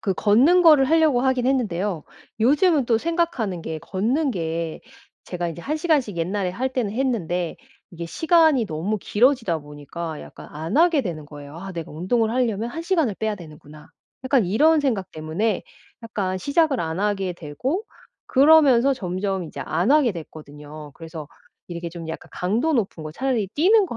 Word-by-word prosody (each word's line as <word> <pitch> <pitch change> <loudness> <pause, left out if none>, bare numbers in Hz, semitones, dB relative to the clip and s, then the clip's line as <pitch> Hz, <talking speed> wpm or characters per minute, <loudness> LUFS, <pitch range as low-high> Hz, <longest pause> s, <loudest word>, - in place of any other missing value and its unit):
그 195 -3 -1
걷는 265 - +4
거를 305 -5 +7
하려고 310 -3 +3
하긴 260 -1 +1
했는데요. 205 - -1 0.4
요즘은 295 - +3
또 230 -2 +3
생각하는 325 - -1
게 160 -1 -5
걷는 230 - -1
게 165 -4 -3 0.4
제가 175 -1 -3
이제 170 +1 -7
1 300 - -2
시간씩 300 - 0
옛날에 185 +3 -1
할 255 +8 -3
때는 235 -6 -1
했는데 185 -9 -1 0.3
이게 170 -1 -7
시간이 320 - +3
너무 190 +5 -2
길어지다 230 - +2
보니까 150 +2 -7
약간 - - -12
안 160 - -4
하게 330 -3 +4
되는 160 -8 -5
거예요. 145 0 -11
'아 195 +2 -7
내가 165 -1 -6
운동을 220 +8 0
하려면 230 -2 -1
1 330 +6 -5
시간을 330 - +1
빼야 220 -1 -1
되는구나.' 155 -4 -13 0.4
약간 260 -4 +3
이런 305 - +4
생각 230 -10 -1
때문에 165 +7 -2 0.4
약간 200 -5 -3
시작을 285 - +1
안 160 +1 -3
하게 195 -3 0
되고 250 - -3 0.4
그러면서 275 -2 +5
점점 190 -3 -3
이제 150 -3 -8
안 180 - 0
하게 295 -5 +4
됐거든요. 150 -2 -10
그래서 160 -2 -9 0.4
이렇게 170 -1 -5
좀 165 -1 -8
약간 160 - -7
강도 225 - 0
높은 205 - -1
거 155 - -6
차라리 245 0 -1
'뛰는 395 +7 +4
거 240 - -6
210 Hz, 345 characters per minute, -23 LUFS, 170-270 Hz, 0.4 s, 거를